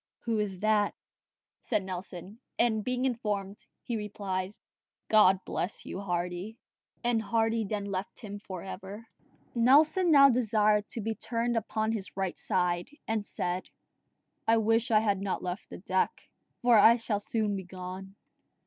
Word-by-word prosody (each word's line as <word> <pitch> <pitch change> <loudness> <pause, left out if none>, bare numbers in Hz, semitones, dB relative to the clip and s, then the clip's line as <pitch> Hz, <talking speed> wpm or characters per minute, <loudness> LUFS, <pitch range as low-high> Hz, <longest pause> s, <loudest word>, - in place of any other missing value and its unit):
"Who 225 -2 -1
is 195 -3 -3
that?" 215 -1 +2 0.6
said 215 -5 -1
Nelson; 185 +2 -7 0.2
and 220 -3 +2
being 250 +2 -1
informed, 210 -5 -2 0.2
he 235 - -2
replied, 200 -2 -4 0.5
"God 195 -3 +5
bless 185 - -3
you, - - -5
Hardy." 180 +3 -3 0.5
And 235 -2 +2
Hardy 225 0 +1
then 205 0 -3
left 195 0 -4
him 205 -2 -7
for 185 -4 -7
ever. 195 +3 -8 0.5
Nelson 300 +9 +5
now 280 -3 +8
desired 215 -4 +2
to 230 - -4
be 225 +2 -1
turned 235 +2 -2
upon 220 0 -1
his 200 -4 -5
right 190 -2 -2
side, 175 -1 0 0.2
and 220 -1 0
said, 180 -2 -3 0.8
"I 225 0 +5
wish 225 +1 +2
I 215 -2 +5
had 200 -3 +1
not 195 -2 -2
left 180 +1 -5
the - - -8
deck, 185 0 -1 0.4
for 240 -3 +6
I 225 +3 +8
shall 225 -3 -2
soon 210 0 -1
be 190 - -4
gone." 185 +1 -8
210 Hz, 150 wpm, -29 LUFS, 190-225 Hz, 0.8 s, now